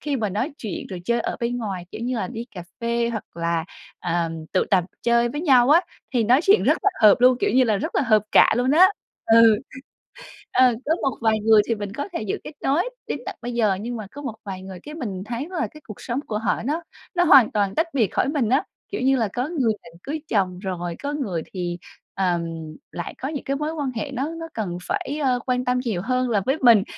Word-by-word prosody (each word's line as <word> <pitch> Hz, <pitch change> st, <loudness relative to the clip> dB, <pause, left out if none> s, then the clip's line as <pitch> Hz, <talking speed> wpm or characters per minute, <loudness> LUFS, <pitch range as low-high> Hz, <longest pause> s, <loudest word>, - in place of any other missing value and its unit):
khi 290 Hz, -2 st, -1 dB
mà 215 Hz, -4 st, -1 dB
nói 215 Hz, -, -2 dB
chuyện 210 Hz, -6 st, -5 dB
rồi 185 Hz, -3 st, -7 dB
chơi 235 Hz, +4 st, +1 dB
ở -, -, -3 dB
bên 240 Hz, +1 st, -1 dB
ngoài, 195 Hz, -6 st, -4 dB
kiểu -, -, -8 dB
như 245 Hz, +2 st, -2 dB
là, 225 Hz, -, -2 dB
đi 235 Hz, -1 st, -6 dB
cà 180 Hz, -, -6 dB, 0.2 s
phê 235 Hz, 0 st, 0 dB
hoặc 220 Hz, -3 st, -4 dB
là, 170 Hz, -1 st, -1 dB, 0.4 s
ờm, 165 Hz, -2 st, -2 dB
tụ 185 Hz, -, +3 dB
tập 185 Hz, -3 st, +4 dB, 0.2 s
chơi 235 Hz, 0 st, +3 dB
với 295 Hz, +5 st, -4 dB
nhau 265 Hz, -5 st, +5 dB
á, 330 Hz, -, +7 dB, 0.3 s
thì 235 Hz, -3 st, +3 dB
nói 250 Hz, +5 st, +5 dB
chuyện 405 Hz, +4 st, +5 dB
rất -, -, +3 dB
là 405 Hz, -, +4 dB
hợp 210 Hz, -2 st, +9 dB
luôn, 255 Hz, 0 st, +6 dB
kiểu -, -, +2 dB
như 255 Hz, +4 st, +4 dB
là, 220 Hz, -3 st, +2 dB
rất 315 Hz, -, -4 dB
là -, -, +2 dB
hợp 215 Hz, -4 st, +4 dB
cạ -, -, +7 dB
luôn 250 Hz, +2 st, +2 dB
đó. 345 Hz, +5 st, +8 dB, 0.4 s
Ừ. 225 Hz, -1 st, +6 dB, 0.9 s
Ờ, 255 Hz, -1 st, +5 dB
có 320 Hz, +3 st, +2 dB
một 270 Hz, -4 st, -1 dB
vài 220 Hz, -1 st, +2 dB
người 215 Hz, 0 st, +6 dB
thì 230 Hz, -, +1 dB
mình 205 Hz, -1 st, -6 dB
có 285 Hz, -, -4 dB
thể -, -, -2 dB
giữ 210 Hz, -3 st, -2 dB
kết -, -, -7 dB
nối 320 Hz, -, +1 dB, 0.2 s
đến -, -, -3 dB
tận -, -, -5 dB
bây 240 Hz, +1 st, -4 dB
giờ, 215 Hz, -5 st, +2 dB
nhưng 240 Hz, +2 st, -4 dB
mà 215 Hz, -3 st, -7 dB
có 290 Hz, -, -9 dB
một 250 Hz, -6 st, -5 dB
vài 190 Hz, -2 st, -6 dB
người 190 Hz, -1 st, -9 dB
cái 300 Hz, +1 st, -8 dB
mình 200 Hz, -, -5 dB
thấy 235 Hz, +7 st, -4 dB
là 355 Hz, -4 st, -2 dB
cái 305 Hz, -, -14 dB
cuộc 215 Hz, -, -9 dB
sống 245 Hz, +1 st, -2 dB
của 210 Hz, -, -2 dB
họ 220 Hz, 0 st, -1 dB
nó 310 Hz, +5 st, -1 dB, 0.3 s
nó 350 Hz, -, +4 dB
hoàn 275 Hz, -9 st, +7 dB
toàn 200 Hz, -2 st, 0 dB
tách 325 Hz, +2 st, +2 dB
biệt 240 Hz, -7 st, +3 dB
khỏi -, -, +1 dB
mình 280 Hz, -6 st, 0 dB
á, 265 Hz, +4 st, +3 dB, 0.3 s
kiểu 405 Hz, -, -3 dB
như 270 Hz, +1 st, +3 dB
là, 225 Hz, -4 st, +1 dB
có 250 Hz, +3 st, -1 dB
người 270 Hz, -9 st, +1 dB
định 170 Hz, 0 st, -15 dB
cưới 305 Hz, +2 st, -4 dB
chồng 185 Hz, -4 st, 0 dB
rồi, 175 Hz, -3 st, -4 dB
có 285 Hz, +1 st, -2 dB
người 205 Hz, -, -2 dB
thì, 175 Hz, -2 st, -3 dB, 0.4 s
ờm, 180 Hz, -3 st, +1 dB, 0.5 s
lại 175 Hz, -, -5 dB
có 265 Hz, -, -4 dB
những 295 Hz, -2 st, -4 dB
cái 275 Hz, -, -1 dB
mối 300 Hz, +3 st, -2 dB
quan 290 Hz, -5 st, -2 dB
hệ 275 Hz, +4 st, -3 dB
nó 270 Hz, +3 st, -2 dB
nó 330 Hz, 0 st, -6 dB
cần 185 Hz, -6 st, -3 dB
phải, 290 Hz, +2 st, -2 dB
ơ, 255 Hz, -2 st, +2 dB
quan 250 Hz, -1 st, 0 dB
tâm 250 Hz, 0 st, +1 dB
nhiều 205 Hz, -7 st, -1 dB
hơn 255 Hz, +4 st, 0 dB
là 215 Hz, -3 st, +2 dB
với 270 Hz, +3 st, +1 dB
mình. 230 Hz, -6 st, +7 dB
235 Hz, 250 wpm, -23 LUFS, 205-275 Hz, 0.9 s, hợp